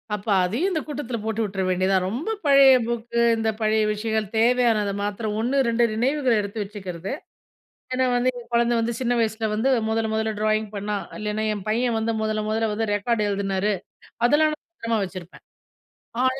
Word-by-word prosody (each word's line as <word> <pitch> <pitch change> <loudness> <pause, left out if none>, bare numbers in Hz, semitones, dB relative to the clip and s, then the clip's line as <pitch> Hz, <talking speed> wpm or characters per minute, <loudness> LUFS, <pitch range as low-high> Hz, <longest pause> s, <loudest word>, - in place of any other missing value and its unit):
அப்ப 205 +2 -10 0.2
அதையும் 250 - 0
இந்த 315 -3 -1
கூட்டத்தில 265 -5 -4
போட்டு 220 0 -2
விட்டுற 200 -2 -3
வேண்டியதுதான். 185 0 +2
ரொம்ப 255 - -3 0.2
பழைய 275 -1 +7
புக்கு 235 0 -2 0.2
இந்த 225 0 0
பழைய 215 0 +2
விஷயங்கள் 220 0 -1
தேவையானதை 230 -4 +3
மாத்திரம் 210 +1 -3
1 250 +5 0
2 235 +1 +3
நினைவுகள 260 +3 +1
எடுத்து 200 +2 -6
வச்சுக்கிறது. 190 -3 -7 0.8
ஏன்னா 260 0 +2
வந்து 245 +1 +2
"என் 235 -1 -11
குழந்தை 235 0 +3
வந்து 235 +1 -1
சின்ன 245 -1 +1
வயசில 220 0 0
வந்து 220 +5 +1 0.2
மொதல 225 0 0
மொதல 220 0 0
ட்ராயிங் 215 0 +1
பண்ணா. 205 +1 -2 0.2
இல்லைனா 210 0 -2
என் 200 -3 -7
பையன் 235 +2 +1
வந்து 225 +1 0
முதல 215 0 -1
முதல 220 +1 0
வந்து 220 0 -1
ரெக்கார்ட் 210 +1 0
எழுதுனாரு." 200 0 0 0.5
அதெல்லாம் 305 +4 +3
நான் 305 - -21
பத்திரமா 230 -8 -2
வச்சிருப்பேன். 185 -2 -10 0.8
ஆனா 260 +1 +1
220 Hz, 170 wpm, -24 LUFS, 210-240 Hz, 0.8 s, பழைய